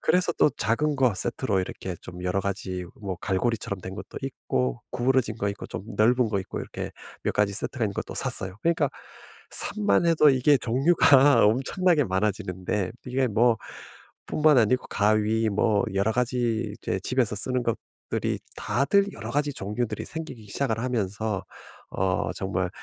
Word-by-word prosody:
그래서 180 -1 +2
또 - - +4
작은 145 +7 +1
거 125 -6 +3
세트로 105 -1 -1
이렇게 90 -1 -5
좀 90 0 -9
여러 90 +2 +1
가지 95 -2 -3 0.2
뭐 95 -4 -4
갈고리처럼 100 0 -1
된 95 +1 -7
것도 105 - -8
있고 65 - -2
구부러진 125 -2 +1
거 100 -2 -1
있고 100 - -7
좀 - - -6
넓은 120 +2 +4
거 100 - +1
있고 95 - -6
이렇게 - - -6 0.3
몇 - - 0
가지 105 -1 +1
세트가 120 +1 -2
있는 100 - -5
것도 - - -5
샀어요. 95 0 -3
그러니까 160 -4 +2 0.6
삽만 100 - +3
해도 155 -3 +5
이게 135 +2 +4
종류가 135 0 +5
엄청나게 145 - +2
많아지는데 95 -1 -1 0.2
이게 130 +1 +1
뭐 115 +2 +3 0.7
뿐만 150 -2 +4
아니고 125 +3 +2
가위 110 +2 +2
뭐 105 0 +2
여러 100 +3 +2
가지 120 -3 0
이제 95 - -2
집에서 125 -3 0
쓰는 125 +4 -1
것들이 115 -2 -3 0.2
다들 195 - +2
여러 - - -7
가지 145 0 0
종류들이 105 +2 -3
생기기 150 -9 -7
시작을 115 0 -1
하면서 110 -4 -2 0.5
어 95 +1 0
정말 95 -1 -2
110 Hz, 335 characters per minute, -26 LUFS, 100-130 Hz, 0.7 s, 해도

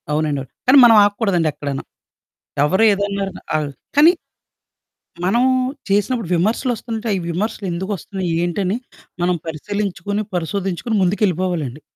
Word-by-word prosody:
అవునండి 150 -1 0
అవును. 135 - -11 0.2
కానీ 265 +3 +7
మనం 230 -2 +7
ఆగకూడదండి 200 -5 +1
ఎక్కడును. 140 -2 -4 0.8
ఎవరు 190 +9 +3
ఏదన్నరన 200 -1 -3 0.2
ఆహ్, 150 -2 0 0.3
కానీ 310 +4 +8 1.1
మనం 235 +7 +3 0.5
చేసినప్పుడు 205 0 0
విమర్శలోస్తుంటాయి. 225 +1 -1
విమర్శలు 205 +4 -2
ఎందుకొస్తున్నాయి? 190 0 -4
ఏంటని 185 +4 -1 0.4
మనం 180 +1 +2
పరిశీలించుకుని, 200 +4 -3
పరిశోధించుకొని 190 +5 -2
ముందుకెళ్ళిపోవాలండి. 180 - 0
195 Hz, 100 wpm, -19 LUFS, 170-210 Hz, 1.1 s, కానీ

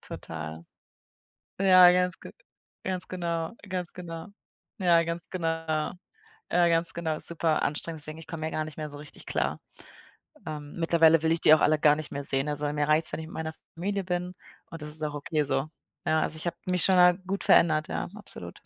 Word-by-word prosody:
total. 80 +1 -7 1.0
Ja, 185 -2 +8
ganz 180 -1 +1
ge - - -10 0.5
ganz 185 -1 -3
genau, 170 -1 -3
ganz 180 -2 -4
genau. 165 -1 -7 0.5
Ja, 175 -4 +4
ganz 170 +1 -5
genau. 175 -3 -3 1.1
Ja, 175 0 +4
ganz 165 0 +2
genau, 160 -2 -2
super 165 -2 0
anstrengend, 155 +2 -2
deswegen, 155 +2 -6
ich 160 - -11
komme 160 -1 -5
hier 160 - -2
gar 155 - 0
nicht 155 -1 -9
mehr 155 -1 -4
so 145 - -9
richtig 150 0 -10
klar. - - -1 0.9
Ähm, 150 -2 -7
mittlerweile 165 -1 +4
will 160 0 +2
ich 165 - +1
die - - +6
auch - - +1
alle 155 0 +3
gar 150 0 +5
nicht 155 0 -6
mehr 140 0 -3
sehen, 135 +1 +2
also, 145 0 0
mir 150 0 0
reicht's, 155 +2 +2
wenn - - -3
ich 160 - -6
mit - - -12
meiner 160 0 -4 0.2
Familie 195 +3 -2
bin 180 0 -2 0.4
und 165 - -8
das 150 - -6
ist 155 +1 -1
auch 150 -1 -2
okay 150 +1 -1
so. 135 0 0 0.4
Ja, 155 0 +3
also, - - 0
ich 155 - -5
habe 170 -1 -2
mich 180 -1 +1
schon 190 - +4
mal 180 0 +6
gut 195 +1 -2
verändert, 155 -2 +4
ja, - - -3
absolut. 140 - -9
160 Hz, 205 wpm, -27 LUFS, 150-175 Hz, 1.1 s, Ja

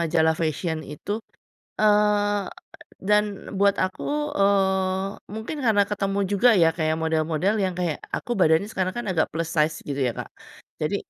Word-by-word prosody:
majalah 160 -1 +2
fashion 160 0 -1
itu, 155 +9 -5 0.6
eee, 205 -1 +3 0.6
dan 210 0 +5 0.3
buat 200 0 +4
aku, 185 - -5 0.3
eee, 190 -1 +2 0.3
mungkin 220 +8 -5
karena 215 -3 +4
ketemu 200 -1 -1
juga 225 +5 +5
ya, 165 - +6
kayak 155 -1 0
model-model 160 +4 0
yang 185 - -1
kayak 175 -4 -1 0.2
aku - - -7
badannya 160 +4 +4
sekarang 185 -1 -1
kan 240 -1 -4
agak 165 -4 +2
plus 165 0 -2
size 155 0 +2
gitu 140 - -2
ya, - - -2
Kak. - - -5 0.6
Jadi, - - 0
190 Hz, 150 wpm, -24 LUFS, 160-205 Hz, 0.6 s, ya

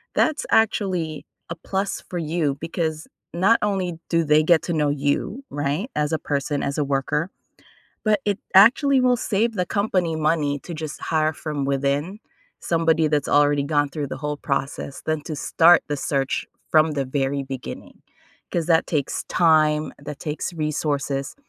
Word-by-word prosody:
that's 310 -1 +1
actually 185 -8 +1 0.2
a 170 - -4
plus 195 +4 -3
for 180 - -3
you 155 -3 -1
because 160 -1 -3 0.3
not 195 +7 +4
only 190 -5 -1
do 165 -1 +2
they 150 0 +4
get 165 0 +4
to 170 - -2
know 150 -2 +1
you, 145 - -1
right, 145 - -2
as 150 0 0
a 160 - 0
person, 145 0 -2
as 140 - -2
a 150 - +2
worker, 140 +5 -1 0.7
but 215 -1 +3
it 205 -2 +1 0.2
actually 260 +7 +6
will 250 -1 +3
save 225 +2 0
the 180 -3 -1
company 185 -5 0
money 150 -2 0
to 170 - -8
just 155 -1 -6
hire 155 -1 +1
from 150 -2 -4
within, 140 +7 -1 0.4
somebody 165 -1 +2
that's 150 -2 0
already 145 0 +3
gone 145 0 +1
through 145 0 -4
the 130 - -6
whole 150 +1 -3
process 140 -1 -3
than 155 -1 -1
to 155 -1 -5
start 170 +4 +5
the 145 -1 -2
search 135 -1 -1 0.3
from 155 0 +4
the 140 -2 -2
very 135 +1 -1
beginning, 135 -1 -8 0.5
'cause 170 -2 -1
that 165 -1 +3
takes 145 -4 -1
time, 155 -2 +3
that 145 0 -8
takes 155 +3 -4
resources 145 -3 -2
155 Hz, 165 wpm, -23 LUFS, 145-175 Hz, 0.7 s, actually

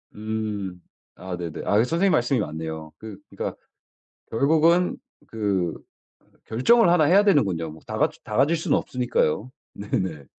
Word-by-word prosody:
음. 105 -4 -4 0.3
아 90 -1 -6
네네. 85 -2 -5
아 - - +1
선생님 170 +9 +1
말씀이 120 -2 +2
맞네요. 80 -2 -5
그 110 -3 -9
그러니까 - - -5 0.8
결국은 160 +8 +3 0.3
그 100 -6 -1 0.7
결정을 175 - +4
1 170 -3 +4
해야 190 +7 +5
되는군요. 95 - +2
뭐 80 - -12
다 - - -5
가질 - - 0
다 105 - -5
가질 150 +6 +3
수는 160 - +1
없으니까요. 125 -3 -1 0.2
네네. 95 -7 -3
110 Hz, 275 characters per minute, -24 LUFS, -, 0.8 s, 해야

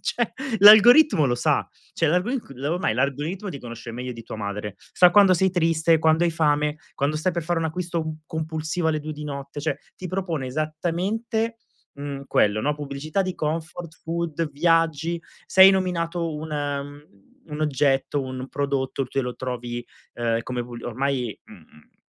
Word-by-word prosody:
Cioè 240 -2 -1 0.3
l'algoritmo 215 - +8
lo 120 -2 +2
sa, 120 - +1 0.3
cioè 165 - +1
l'algorig 220 - 0 0.2
ormai 175 +6 0
l'algoritmo 150 +9 -2
ti 140 - -6
conosce 120 -1 -8
meglio 125 +1 -5
di 115 - -10
tua 110 - -8
madre, 105 -1 -5
sa 180 -1 +4
quando 200 -1 +6
sei 190 +2 +3
triste, 165 -2 +2
quando 160 +2 +3
hai 170 - +2
fame, 150 -2 +1 0.2
quando 145 +2 0
stai 175 +4 0
per 170 -1 -2
fare 170 +1 -1
un 165 - -1
acquisto 165 -1 -3
compulsivo 160 +1 -2
alle 155 -1 0
2 155 +1 -5
di 150 0 -7
notte, 140 0 -6
cioè, 150 -2 -1 0.2
ti 185 - -6
propone 175 -7 -2
esattamente, 180 - -2 0.4
mhmm, 140 -1 -6
quello, 105 +1 +2
no, 145 +4 0
pubblicità 150 +5 -3
di 185 -2 -3
comfort 160 +2 -4
food, 165 -1 -2
viaggi, 165 +1 +1 0.3
sei 190 +1 +8
nominato 170 -3 -1
un 155 +1 -6
mhmm, 145 -6 -5 0.3
un 150 +1 -5
oggetto, 140 -1 +1
un 130 0 -6
prodotto, 140 -2 -2
tu 135 +1 -1
lo 125 -1 -4
trovi, 120 -1 -4 0.3
ehm, 115 -1 -1
come 125 +1 -4
v 120 - -11
ormai, 125 -2 -2
mhmm 75 - -18
155 Hz, 165 wpm, -24 LUFS, 140-170 Hz, 0.4 s, l'algoritmo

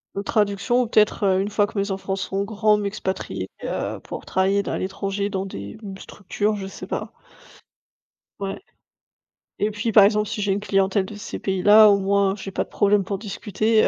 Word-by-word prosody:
De 200 - -2
traduction 210 +4 +1
ou - - -4
peut-être, 215 -1 +2
heu, 190 -1 +3
une 200 - -2
fois 205 0 +2
que 205 - -9
mes 200 0 0
enfants 195 0 -3
seront 195 0 -2
grands, 215 0 +2
m'expatrier, 200 -2 -4 0.2
heu, - - -3
pour - - -8
travailler 195 +2 +1
là, - - -4
à - - -1
l'étranger 195 +1 -2
dans 195 -1 -3
des 100 - -8 0.2
structures, 205 +3 -2
je 195 -2 -5
sais 195 - -9
pas. - - -4 1.3
Ouais. 195 - -4 1.0
Et 210 +1 +1
puis 220 +3 -2
par 205 -1 +8
exemple 210 +1 +3
si 210 - -4
j'ai 200 -1 +1
une 195 - 0
clientèle 195 -1 +1
de 210 - -9
ces 210 +2 -7
pays-là, 205 +3 +6
au 200 - +5
moins 195 0 +2
j'ai 195 -1 -7
pas - - -1
de - - -20
problème 205 0 +2
pour 195 +1 -3
discuter, 215 +1 +1
200 Hz, 195 wpm, -23 LUFS, 195-210 Hz, 1.3 s, par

